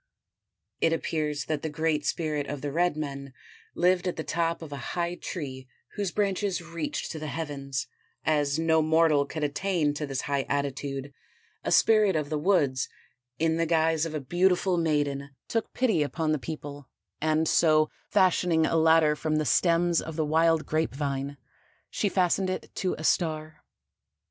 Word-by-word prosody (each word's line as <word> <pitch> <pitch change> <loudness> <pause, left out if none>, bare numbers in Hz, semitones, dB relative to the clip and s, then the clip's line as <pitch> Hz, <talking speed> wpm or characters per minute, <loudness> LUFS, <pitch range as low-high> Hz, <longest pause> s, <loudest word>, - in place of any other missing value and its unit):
It 165 - +3
appears 150 -4 -2
that 155 -1 -2
the 160 - -3
Great 155 -1 -1
Spirit 150 -3 -1
of 145 -2 -5
the 145 - -3
red 175 0 +1
men 140 -3 -5 0.4
lived 180 +1 +2
at 180 - -1
the 160 - -4
top 165 +2 -1
of 155 - -9
a 140 +4 -6
high 175 0 0
tree 135 -8 -6 0.3
whose 205 -3 -2
branches 200 -1 0
reached 170 -3 -4
to 160 - -6
the 155 - -5
heavens; 140 -4 -4 0.4
as 145 -2 +2
no 160 0 +3
mortal 155 -2 +3
could 155 0 -4
attain 150 +1 0
to 150 0 -4
this 135 -1 -2
high 140 -1 -1
attitude, 140 0 -3 0.5
a - - -2
spirit 215 -4 +5
of 150 -1 -2
the 155 - 0
woods, 145 -8 +2 0.5
in 160 0 +1
the 165 0 +1
guise 160 -1 +2
of 155 - -6
a - - -1
beautiful 180 +5 +2
maiden, 145 -4 -1
took 225 -1 -2
pity 220 -11 +1
upon 155 +2 -1
the 155 - +1
people 145 -2 -7 0.3
and 155 +1 +2
so 155 -1 +4 0.2
fashioning 175 -3 +3
a 165 - +1
ladder 160 -1 +5
from 155 0 -1
the 155 0 +1
stems 170 +3 +3
of 160 - -7
the 155 -1 0
wild 160 +1 +3
grape 155 -3 -1
vine, 140 0 -3 0.5
she 205 - 0
fastened 185 0 +1
it 185 - -4
to 185 - -1
a 155 - -7
star. 155 -2 0
155 Hz, 170 wpm, -27 LUFS, 145-170 Hz, 0.5 s, spirit